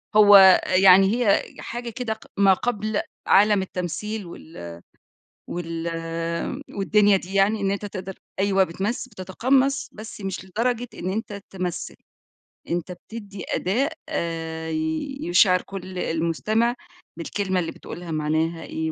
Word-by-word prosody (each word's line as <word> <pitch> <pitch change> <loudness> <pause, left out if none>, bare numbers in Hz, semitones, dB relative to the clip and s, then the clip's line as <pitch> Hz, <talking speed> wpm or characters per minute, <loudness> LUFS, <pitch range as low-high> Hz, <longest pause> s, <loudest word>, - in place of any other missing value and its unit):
هو 200 -3 +9
يعني 190 +2 +6
هي 200 - +4 0.2
حاجة 240 0 -5
كده 230 -1 -3
ق 220 - -16
ما 195 -1 +6
قبل 215 -1 -1 0.3
عالم 205 0 +5
التمثيل 190 +3 -4
وال 85 - -10 0.7
وال 165 -1 -4 0.9
والدنيا 205 0 +4
دي 185 +1 -9
يعني 200 +2 +3
إن 195 0 +1
أنتَ 200 +1 -3
تقدر 190 -1 -6 0.2
أيوه 195 -1 +3
بتمث 195 +8 -3
بتَتَقَمَّص، 260 +7 0
بس 215 0 -9
مش 190 -1 -4
لدرجة 240 +5 -1
إن 185 - -3
أنتَ 205 -2 -4
تمثل، 180 -2 -4 0.7
أنتَ 175 +1 -2
بتدِّي 205 0 -9
أداء 250 - 0 0.2
آآ 165 -1 -3 0.5
يُشعر 180 +1 +4
كل 185 -1 -7
المُستمع 210 +10 0 0.4
بالكلمة 190 +2 -1
اللي 165 - -2
بتقولها 175 -1 -9
معناها 160 +2 -1
إيه 160 0 -3
195 Hz, 125 wpm, -24 LUFS, 175-210 Hz, 0.9 s, هو